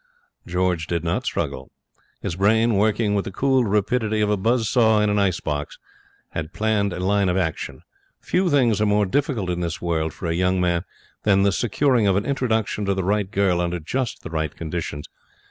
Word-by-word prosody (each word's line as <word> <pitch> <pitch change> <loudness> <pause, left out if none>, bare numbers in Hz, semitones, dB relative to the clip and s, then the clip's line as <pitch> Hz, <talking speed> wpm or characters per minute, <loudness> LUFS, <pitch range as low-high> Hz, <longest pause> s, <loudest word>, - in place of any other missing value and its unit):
George 90 -2 0
did 85 -1 -2
not 85 0 -1
struggle. - - -3 0.5
His 85 - -2
brain, 110 +5 +3
working 105 +1 +2
with 100 -1 +1
the - - -6
cool 130 +3 +2
rapidity 110 +2 0
of 105 0 +2
a - - +3
buzz 115 +3 +1
saw 110 -3 +4
in 105 0 +2
an 105 - +1
ice 95 -4 +1
box, 75 -1 -4 0.5
had 80 +1 -5
planned 105 -2 +1
a 90 - -5
line 100 +1 +2
of 90 - +1
action. 80 -4 -3 0.4
Few 185 0 0
things 120 -8 +3
are 105 - +3
more 105 0 +3
difficult 120 - -1
in 90 - -2
this 85 -2 -3
world 80 -2 -1
for - - -9
a 85 - 0
young 90 +2 +1
man 85 -1 0 0.4
than 100 -2 +3
the 100 - +3
securing 120 +2 +1
of 95 - +3
an 100 - 0
introduction 115 -6 -1
to 100 0 +1
the 95 - -1
right 100 +1 0
girl 95 -4 +1
under 85 0 -2
just 125 +10 -3
the 80 - -7
right 80 -2 -2
conditions. 80 -3 -5
100 Hz, 200 wpm, -23 LUFS, 90-110 Hz, 0.5 s, saw